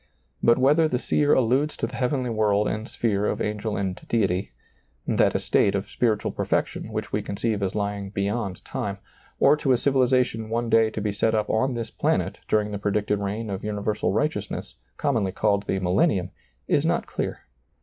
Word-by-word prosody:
But 115 - +5
whether 150 +5 +4
the 125 - 0
seer 145 +3 +2
alludes 130 +5 +2
to - - -1
the - - -7
heavenly 125 -1 0
world 105 -1 +2
and 110 +1 -3
sphere 105 -3 0
of - - -1
angel 105 0 -2
and 95 -2 -1
deity 95 - 0 0.3
— - - -42 0.2
that - - +2
estate 100 - +2
of 100 +1 -3
spiritual 110 -4 0
per - - -3
fection 110 - -1
which 110 -1 -4
we 105 - +1
conceive 105 +1 -2
as 95 -1 -1
lying 100 -1 -2
beyond 100 -1 -3
time 100 -1 -3 0.2
— - - -31
or 140 - +6
to 135 -3 +2
a - - +3
civilization 125 -4 +1
one 115 0 -1
day 115 -1 +5
to 110 - -5
be 105 0 0
set 110 +2 +1
up 110 - 0
on 125 +3 +1
this 115 -2 -4
planet - - 0
during 105 -1 +1
the 100 - -4
predicted 105 0 0
reign 105 +2 -3
of 95 - -4
universal 105 0 -1
righteousness, 105 -2 -2 0.2
commonly 115 -9 0
called 100 0 0
the 95 - 0
millentum, 90 0 +1 0.4
is - - +2
not - - +1
clear. - - -4
105 Hz, 190 wpm, -25 LUFS, 100-120 Hz, 0.4 s, or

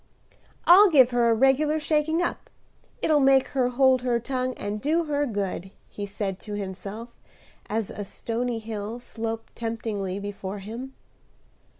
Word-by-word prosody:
"I'll 385 +4 +8
give 260 -6 +6
her 240 -1 +3
a - - +5
regular 270 +5 +3
shaking 310 +2 +1
up; - - -4 0.5
it'll 305 -2 +4
make 270 -1 +4
her 260 -3 +1
hold 260 0 +4
her 245 -2 +1
tongue 255 +1 -2
and 205 +1 -4
do 320 +5 +2
her 290 -2 0
good," 195 -4 -3 0.2
he 205 -1 -6
said 195 -2 -4
to 210 -1 -6
himself, 200 +3 -6 0.6
as 220 -1 -2
a 205 - -5
stony 235 +4 -3
hill 220 0 -5
sloped 225 -2 -5
temptingly 220 -4 -3
before 200 -1 -5
him. 230 +7 -8
235 Hz, 150 wpm, -26 LUFS, 205-270 Hz, 0.6 s, I'll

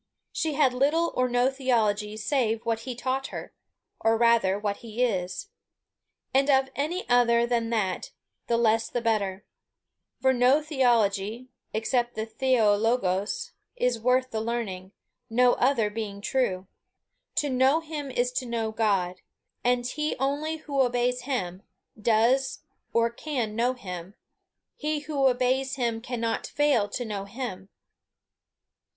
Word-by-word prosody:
She 315 -2 -1
had 275 -4 +3
little 295 +6 +2
or 255 0 +2
no 245 +2 +2
theology 215 -6 0
save 230 -1 0
what 230 -1 0
he 245 +2 -6
taught 260 +2 -2
her, - - -8 0.5
or 225 0 +3
rather, 230 -5 +4
what 205 -1 -2
he 235 +1 -3
is. 190 - -2 0.8
And 270 +2 +3
of 265 -1 +4
any 320 +6 -2
other 235 -1 +4
than 235 -1 0
that, 205 -6 -1 0.4
the 235 - +2
less 225 -1 +2
the 245 - -1
better; 205 -4 -1 0.7
for 265 0 +3
no 255 +3 +4
theology, 240 -6 +1 0.2
except 240 +2 0
the 220 0 -2
Θεοῡ 225 -3 +2 0.2
λόγος, 205 - -2 0.2
is 250 - 0
worth 255 +2 +2
the 220 - -2
learning, 210 -5 -3 0.4
no 245 +2 +4
other 245 -5 +2
being 210 -2 -5
true. 200 -5 0 0.7
To 290 - +1
know 260 +4 +4
him 305 -3 -6
is 250 -1 0
to 250 0 -3
know 225 -2 -2
God. 195 -5 0 0.4
And 245 0 +2
he 300 +5 -2
only 290 +4 -1
who 285 -3 -1
obeys 245 0 +1
him, 190 -9 -2 0.3
does 230 +5 +2 0.3
or 230 0 +2
can 235 -5 -3
know 240 +3 +2
him; 185 -5 -8 0.6
he 300 0 -2
who 290 -3 +1
obeys 260 +1 +1
him 235 -3 -1
cannot 230 -2 -2
fail 285 -9 +2
to 245 - -4
know 205 -3 -4
him. 200 -3 -6
240 Hz, 140 wpm, -27 LUFS, 220-265 Hz, 0.8 s, rather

